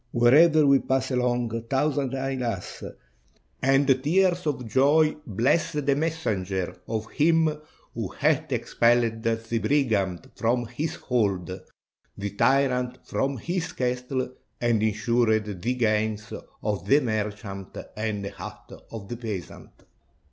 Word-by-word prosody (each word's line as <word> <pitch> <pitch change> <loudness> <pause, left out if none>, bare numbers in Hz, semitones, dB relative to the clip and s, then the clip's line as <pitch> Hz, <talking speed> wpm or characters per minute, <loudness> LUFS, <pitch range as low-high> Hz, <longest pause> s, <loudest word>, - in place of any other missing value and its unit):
Wherever 150 +6 +6
we 140 -1 +6
pass 130 0 -1
along, 120 -2 0
thousands 140 -1 0
hail 135 -1 -2
us, 115 -7 -4 0.8
and 135 0 +3
tears 180 +1 +2
of 125 -5 -2
joy 145 +6 +4
bless 120 - +1
the 145 -2 +1
messengers 105 - -2
of 110 -1 -3
him 160 0 +3 0.4
who - - -3
hath - - 0
expelled 115 -1 +2
the 115 0 -1
brigand 110 -11 0
from 120 +1 0
his 145 +7 -4
hold, 95 -7 -1 0.6
the 100 0 -3
tyrant 125 +2 +1
from 135 0 -1
his 175 - -3
castle, 125 +1 -1 0.3
and 115 -3 +2
insured 110 0 +2 0.2
the 125 +5 0
gains 110 -2 0 0.3
of 105 -2 -2
the 140 - +6
merchant 105 -5 -4 0.2
and 105 -2 -2
the - - -3
hut - - -10 0.2
of 110 -3 -7
the 120 - -5
peasant." 105 -7 -6
120 Hz, 125 wpm, -26 LUFS, 110-140 Hz, 0.8 s, Wherever